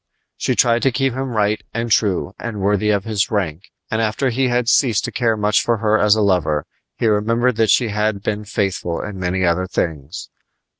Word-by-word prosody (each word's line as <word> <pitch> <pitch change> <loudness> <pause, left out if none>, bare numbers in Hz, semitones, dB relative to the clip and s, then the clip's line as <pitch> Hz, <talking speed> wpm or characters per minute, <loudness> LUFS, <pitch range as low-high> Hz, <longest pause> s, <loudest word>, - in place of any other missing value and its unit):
She - - -1
tried 120 0 +3
to 135 - +2
keep 135 +1 0
him 135 +1 -3
right 105 -2 0
and 115 0 -2
true 100 -2 +1
and 115 -3 -5
worthy 105 +2 +1
of 100 -2 +1
his 105 -2 -1
rank; 95 -5 -3 0.2
and 110 - 0
after 115 +4 0
he 130 +2 +1
had 120 -1 0
ceased 120 -3 +3
to - - -4
care 115 -3 0
much 105 -1 +2
for 120 -1 0
her 110 0 +1
as 105 0 +4
a 110 - 0
lover 80 -6 +1 0.3
he - - -1
remembered 115 +3 +2
that 110 -2 +2
she 120 +2 +3
had 105 -1 -1
been 105 0 -2
faithful 95 -4 -2
in 105 -2 -6
many 95 +1 -1
other 90 +2 +1
things. 80 -1 -4
105 Hz, 205 wpm, -19 LUFS, 95-115 Hz, 0.3 s, as